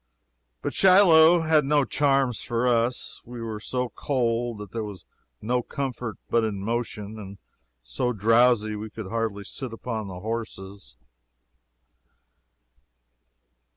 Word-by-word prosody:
But - - -2
Shiloh 175 -3 +6
had 160 -2 +3
no 145 0 +2
charms 135 -2 +1
for 120 +1 -1
us. 120 +1 0
We 120 0 -9
were 110 -2 -5
so 125 +3 -3
cold 120 -4 -1
that 105 -2 -9
there 115 -1 -3
was 100 -4 -9 0.4
no 125 +3 +1
comfort 125 -3 -5
but 115 - +2
in 105 -3 -2
motion, 110 0 -4
and 100 -1 -9 0.5
so - - -2
drowsy 115 0 +3
we 105 +1 -6
could 105 -2 -8
hardly 110 -3 -2
sit 130 +5 -5
upon 115 -2 -5
the 90 -1 -8
horses. 100 - -6
115 Hz, 125 wpm, -25 LUFS, 105-125 Hz, 0.5 s, Shiloh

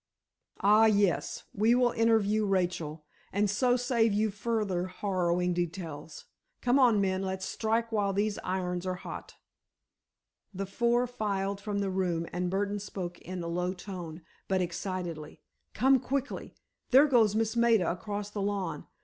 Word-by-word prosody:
"Ah, 210 +2 +6
yes; 205 -4 +1
we 220 +4 +3
will 245 -1 +3
interview 220 -2 +2
Rachel, 175 -5 -1 0.3
and 205 +2 +2
so 245 +5 +2
save 240 -3 +2
you 215 +1 +1
further 205 -4 -1
harrowing 180 -2 0
details. 165 -3 -5 0.3
Come 250 +2 +3
on, 240 -5 +5
men, 190 -1 +1
let's 190 0 -3
strike 225 +3 -1
while 205 -2 +1
these 205 +1 0
irons 180 -1 -2
are 185 - -1
hot." 180 - -8 1.2
The 195 +1 -2
four 235 +5 +1
filed 200 -5 -2
from 200 0 -2
the 195 -1 -1
room, 180 -3 0
and 180 0 -1
Burdon 200 +2 -1
spoke 185 -3 -6
in 180 0 -6
a - - -4
low 180 +2 -1
tone, 175 -3 -8 0.2
but 190 -1 +1
excitedly: 175 -3 -4 0.3
"Come 265 +1 +4
quickly! 275 +2 -3 0.3
There 270 +3 +7
goes 230 -7 +4
Miss 225 +1 0
Maida 230 -6 +3
across 205 +3 -5
the 205 - -4
lawn. 200 -1 -2
200 Hz, 150 wpm, -30 LUFS, 180-220 Hz, 1.2 s, There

